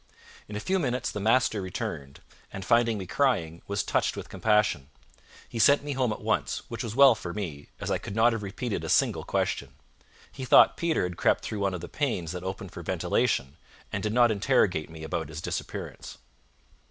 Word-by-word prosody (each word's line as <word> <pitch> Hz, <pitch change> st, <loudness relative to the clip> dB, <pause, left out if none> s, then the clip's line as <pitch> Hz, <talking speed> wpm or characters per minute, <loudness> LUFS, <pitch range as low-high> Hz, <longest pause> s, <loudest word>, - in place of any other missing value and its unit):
In 105 Hz, -, -6 dB
a -, -, -2 dB
few 190 Hz, -, 0 dB
minutes 125 Hz, -5 st, -1 dB
the 105 Hz, -, -4 dB
master 110 Hz, 0 st, +2 dB
returned, 70 Hz, -7 st, -5 dB, 0.3 s
and 95 Hz, -1 st, -7 dB
finding 115 Hz, -1 st, +3 dB
me 95 Hz, -, -5 dB
crying, 90 Hz, -, 0 dB
was 100 Hz, 0 st, -1 dB
touched -, -, 0 dB
with -, -, -7 dB
compassion. 105 Hz, -11 st, +1 dB, 0.6 s
He 115 Hz, -, -6 dB
sent 140 Hz, +5 st, +5 dB
me 145 Hz, 0 st, -3 dB
home 130 Hz, -3 st, 0 dB
at -, -, -6 dB
once, -, -, -1 dB
which -, -, -4 dB
was 110 Hz, -1 st, -5 dB
well 135 Hz, -1 st, +8 dB
for 90 Hz, -5 st, -7 dB
me, 80 Hz, -9 st, -5 dB
as -, -, -3 dB
I -, -, +1 dB
could 100 Hz, -, -7 dB
not 115 Hz, +1 st, +4 dB
have 115 Hz, -, -3 dB
repeated 105 Hz, +2 st, -4 dB
a -, -, -4 dB
single -, -, +2 dB
question. 65 Hz, -2 st, -2 dB, 0.6 s
He 130 Hz, -, -8 dB
thought 130 Hz, -, +6 dB
Peter 170 Hz, -, 0 dB
had 90 Hz, -1 st, -4 dB
crept -, -, +2 dB
through 105 Hz, -, -4 dB
one 100 Hz, -2 st, 0 dB
of 90 Hz, -, -6 dB
the -, -, -6 dB
panes 115 Hz, -, -2 dB
that 90 Hz, -1 st, -5 dB
opened 95 Hz, -1 st, -5 dB
for -, -, -8 dB
ventilation, 70 Hz, +2 st, 0 dB, 0.4 s
and 100 Hz, -, -1 dB
did 105 Hz, -, -1 dB
not 120 Hz, 0 st, +4 dB
interrogate 100 Hz, -, +1 dB
me 80 Hz, -1 st, -10 dB
about 80 Hz, -2 st, -3 dB
his 75 Hz, 0 st, -7 dB
disappearance. -, -, -6 dB
105 Hz, 200 wpm, -27 LUFS, 90-120 Hz, 0.6 s, well